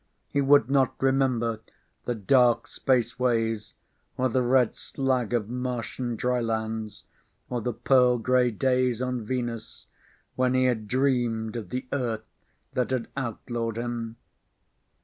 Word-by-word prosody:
He 140 - 0
would 140 -3 +5
not 135 -1 +2
remember 130 -4 +1 0.5
the 120 - -1
dark 120 +3 +3
spaceways 115 -3 0 0.4
or 130 0 +2
the 130 +2 +1
red 125 -1 +3
slag 130 -4 -1
of 115 -4 0
Martian 125 0 -3
drylands 110 -3 -2 0.5
or 120 -1 -1
the 125 - -1
pearl 125 +1 +4
gray 125 +1 +3
days 125 0 +1
on 125 -2 -2
Venus 120 -1 -4 0.5
when 130 0 +2
he 130 - +3
had 115 -4 0
dreamed 120 -4 0
of 110 -6 -5
the 125 +1 -3
Earth 115 -5 -2 0.5
that 125 - 0
had 130 -3 -2
outlawed 115 -2 -3
him. 115 -1 -4
120 Hz, 130 wpm, -27 LUFS, 115-130 Hz, 0.5 s, would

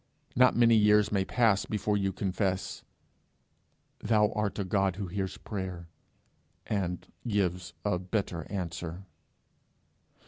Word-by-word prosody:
Not 125 +1 +5
many 115 -1 +5
years 105 -1 +5
may 100 -2 +2
pass 110 -1 +2
before 105 0 0
you 95 -1 +1
confess, 95 0 -2 1.2
'Thou 105 -1 +3
art 105 -1 -2
a 100 - 0
God 95 0 +1
who 100 +1 -4
hears 95 +1 -3
prayer, 95 -4 -6 0.8
and 90 -4 -2 0.2
gives 90 -4 -1
a 95 -4 +1
better 90 -3 -3
answer.' 85 -1 -4
100 Hz, 115 wpm, -29 LUFS, 90-105 Hz, 1.2 s, Not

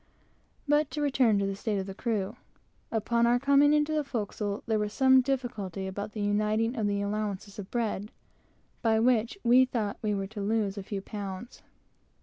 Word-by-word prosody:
But 295 0 +3
to 305 - -5
return 255 -7 +3
to 200 - +1
the 195 0 -2
state 205 +1 -2
of 190 - -2
the 195 - -6
crew. 205 -2 -2 0.6
Upon 235 +1 +2
our 240 +1 +4
coming 280 +2 +4
into 300 +1 +2
the 305 -1 +1
forecastle, 210 -5 -3
there 220 -1 +1
was 210 0 -2
some 260 -1 +6
difficulty 240 -8 -3
about 200 +2 -5
the 215 - -4
uniting 215 +3 +1
of 220 -4 0
the 200 0 0
allowances 205 -1 -3
of 195 -1 -7
bread, 215 -3 -2 0.7
by 225 -2 +3
which 235 - +2
we 245 +2 +6
thought 220 -5 -2
we 210 -1 0
were 195 -1 -2
to 205 +1 -7
lose 205 -1 0
a 200 - -5
few 195 0 -5
pounds. 200 +2 -7
215 Hz, 185 wpm, -29 LUFS, 200-245 Hz, 0.7 s, some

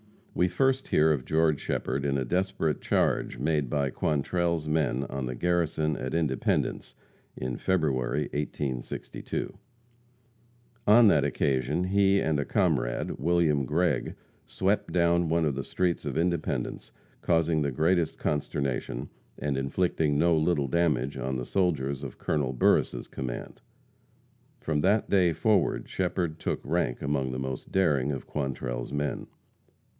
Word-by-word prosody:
We 90 - +2
first 135 +9 +1
hear 80 +1 +4
of 65 -4 -1
George 80 -2 +2
Shepherd 70 - -2
in 70 0 +1
a 65 - -1
desperate 90 -1 -1
charge - - 0
made 75 0 0
by 70 0 0
Quantrell's 80 +3 0
men 75 -4 +1
on 70 -2 -4
the 65 - -4
garrison 80 -1 0
at 65 +3 -4
Independence, 75 -6 -1 0.4
in 65 -1 -3
February, 75 -6 0
1862. 70 -4 -4 1.3
On 110 +2 +7
that 75 -7 +4
occasion 70 +3 0
he 100 +1 +3
and 80 -5 +1
a 70 - -1
comrade, - - 0
William 85 -5 +2
Gregg, 80 +2 0 0.3
swept 95 +2 0
down 85 -1 +2
one 85 0 +2
of 75 - +1
the 70 +1 -3
streets 90 -2 -1
of - - -3
Independence, 85 -1 -1 0.3
causing 80 -2 +2
the 70 - +1
greatest 80 +5 +1
consternation, 70 -2 -2 0.3
and 70 -2 -2
inflicting 75 +2 0
no 85 +2 +4
little 80 -3 +1
damage 75 -4 +1
on 65 +1 -2
the 60 -1 -3
soldiers 70 -8 0
of 70 - -7
Col. 70 -4 -1
Burris' 60 - +2
command. 65 -2 -6 1.0
From 75 -2 0
that 100 +5 +2
day 90 -4 +4
forward 100 +5 +1
Shepherd 90 -3 -2
took - - -2
rank - - -1
among 70 -2 0
the 65 - -4
most 65 -1 -5
daring 75 -8 +2
of 70 - -5
Quantrell's 65 -4 -4
men. 75 0 -2
75 Hz, 140 wpm, -28 LUFS, 70-85 Hz, 1.3 s, On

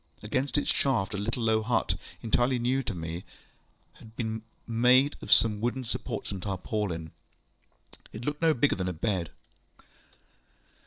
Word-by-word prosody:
Against 130 +7 0
its 145 - +1
shaft, 120 -9 +1
a - - -2
little 115 +3 -2
low 110 -1 +3
hut, 110 +1 +1 0.3
entirely 120 +3 +2
new 125 +3 +1
to 115 - -4
me, 85 +1 -5 0.8
had 110 0 -14
been 110 -1 -3 0.2
made 125 +5 +4
of - - -6
some 105 -2 +5
wooden 120 +3 -1
supports 115 - -4
and 95 -2 -5
tarpaulin. 95 -4 -3 1.0
It 115 +3 -7
looked 150 +1 -2
no 160 -2 +4
bigger 140 +4 +3
than 95 -1 -2
a - - -2
bed. 90 0 -1
110 Hz, 150 wpm, -29 LUFS, 100-125 Hz, 1.0 s, some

